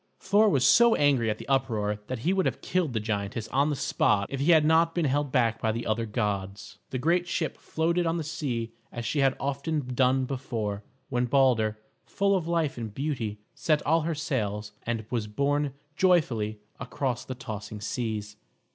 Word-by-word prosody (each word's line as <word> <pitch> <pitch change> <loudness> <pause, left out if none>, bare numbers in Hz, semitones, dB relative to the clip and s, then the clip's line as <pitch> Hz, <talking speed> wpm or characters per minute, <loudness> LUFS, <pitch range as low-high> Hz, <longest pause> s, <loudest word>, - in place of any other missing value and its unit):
Thor 210 +2 +4
was 135 -8 +2
so 235 - +6
angry 135 -6 +3
at 105 - -1
the - - -10
uproar 110 -6 0
that 130 - -3
he 180 - +3
would 190 -1 +2
have - - -3
killed 175 -8 0
the 110 - 0
giantess 105 +1 -3
on 140 +3 +2
the 150 - 0
spot 105 -5 +1
if 135 - -3
he 140 +5 +1
had 160 -2 +6
not 165 +1 +3
been 170 -3 +1
held 145 0 0
back 115 -4 +1
by 110 - +1
the 115 +2 -4
other 115 +1 -1
gods. 105 -3 -3
The 130 - -3
great 170 +6 +1
ship 165 -2 -2
floated 170 +2 0
on 165 +1 0
the 165 - -2
sea 125 -7 -3 0.2
as 120 -1 -5
she 145 +6 -1
had 135 -1 +3
often 140 -1 -2
done 130 +1 +3
before, 115 -6 -3 0.3
when 125 -2 +1
Balder, 120 -5 +3 0.3
full 200 0 +1
of 175 -4 -1
life 165 -6 0
and 110 -2 -5
beauty, 115 -5 -3
set 155 -2 0
all 165 +2 +3
her 165 +1 -2
sails 110 - -2 0.2
and 115 -2 -2
was 115 -4 -1
borne 140 +5 0 0.2
joyfully 130 - +2 0.2
across 130 -4 -2
the 130 - -6
tossing 110 -3 -7
seas. 105 -1 -4
130 Hz, 190 wpm, -27 LUFS, 110-155 Hz, 0.3 s, so